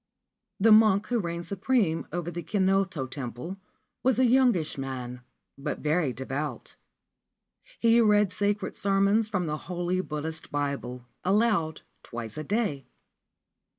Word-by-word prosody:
The 220 +3 +5
monk 215 -2 +6
who 245 -1 +1
reigned 170 -2 -4
supreme 200 -4 0
over 175 0 -3
the 175 +1 -4
Kinot 195 +1 +2 0.2
Temple 135 - -5 0.4
was 260 -3 +2
a 260 - +4
youngish 240 -10 +3
man, 125 -2 -5 0.4
but 140 - -3
very 155 -2 +1
devout; 130 +1 -5 1.0
he 230 0 +5
rea 210 -2 +5
sacred 200 +1 -1
sermons 200 +2 +2
from 185 -4 -1
the 150 -1 -2
holy 180 +1 0
Buddhist 160 -1 -5
Bible, 140 -4 -3 0.2
aloud, 195 -5 +2 0.2
twic 115 -2 -7
a 155 - -4
day. 165 - -1
180 Hz, 125 wpm, -27 LUFS, 145-210 Hz, 1.0 s, monk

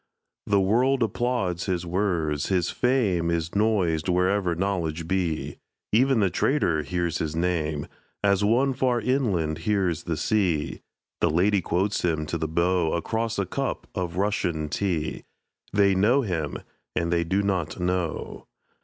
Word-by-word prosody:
The 100 -1 +3
world 125 +7 +3
applauds 105 -6 -1
his 90 -2 -1
words; 85 -5 0
his 90 -3 +1
fame 105 -10 +1
Is 85 -1 -1
noised 95 -6 +1
wherever 90 0 +2
knowledge 85 -4 -2
be; 90 -4 -2 0.3
Even 125 +1 +4
the 95 -3 +2
trader 90 - +1
hears 85 +3 -2
his 80 0 -2
name, 80 -4 -1 0.4
As 100 0 +3
one 125 +6 +3
far 125 -1 +1
inland 105 - 0
hears 95 -6 0
the 80 -2 -2
sea; 85 -4 0 0.4
The - - +3
lady 95 +5 +2
quotes 95 +4 0
him 80 -3 0
to 85 +2 -3
the 80 - -1
beau 85 +1 +1
Across 110 +6 -1
a 100 - 0
cup 135 +8 -3
of 90 -3 -3
Russian 90 -6 0
tea; 85 -4 -2 0.5
They 100 -1 +4
know 110 +9 +3
him 80 -8 -2 0.4
and 85 0 0
they 85 -1 +2
do 95 +4 0
not 95 -5 -1
know. 90 -2 -2
90 Hz, 145 wpm, -25 LUFS, 85-105 Hz, 0.5 s, Even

